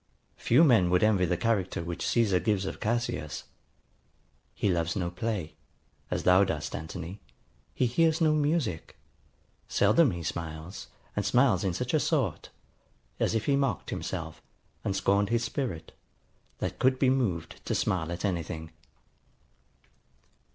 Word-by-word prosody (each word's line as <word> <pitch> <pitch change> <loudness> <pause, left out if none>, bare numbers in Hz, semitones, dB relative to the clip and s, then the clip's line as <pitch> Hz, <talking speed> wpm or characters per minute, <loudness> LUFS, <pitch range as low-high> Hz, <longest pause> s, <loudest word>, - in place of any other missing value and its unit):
] - - -43
Few 125 +8 +4
men 115 - +5
would 90 +2 +3
envy 105 -4 +4
the 90 0 0
character 95 -6 0
which 85 0 -4
Caesar 105 -6 +3
gives 105 -3 0
of - - -5
Cassius: 110 -9 -2 1.1
He - - 0
loves 85 -3 0
no 85 -2 -2
play, 100 -4 -3 0.6
As - - -2
thou 90 +2 +6
do'st, 95 -6 -3
Anthony: 85 +4 -7 0.5
he 130 - +2
hears 160 +6 +2
no 155 -2 +4
music: 145 - -1 0.7
Seldom 165 -5 +4
he 85 -4 -4
smiles; 80 +2 -5 0.3
and - - 0
smiles 125 -8 +3
in 95 -3 0
such 125 +3 -3
a 155 - +4
sort, 135 - -1 0.7
As - - +1
if 110 - 0
he 140 - +3
mock'd 135 - -1
himself, 80 -4 -5 0.4
and 95 - -1
scorn'd 100 +1 +2
his 115 0 +1
spirit 110 - -4 0.7
That - - -4
could 130 0 +3
be 130 -1 +3
mov'd 100 -12 -1
to - - 0
smile 85 -3 0
at 85 +3 -3
any 90 -4 0
thing. 80 0 -7
100 Hz, 150 wpm, -28 LUFS, 85-125 Hz, 1.1 s, thou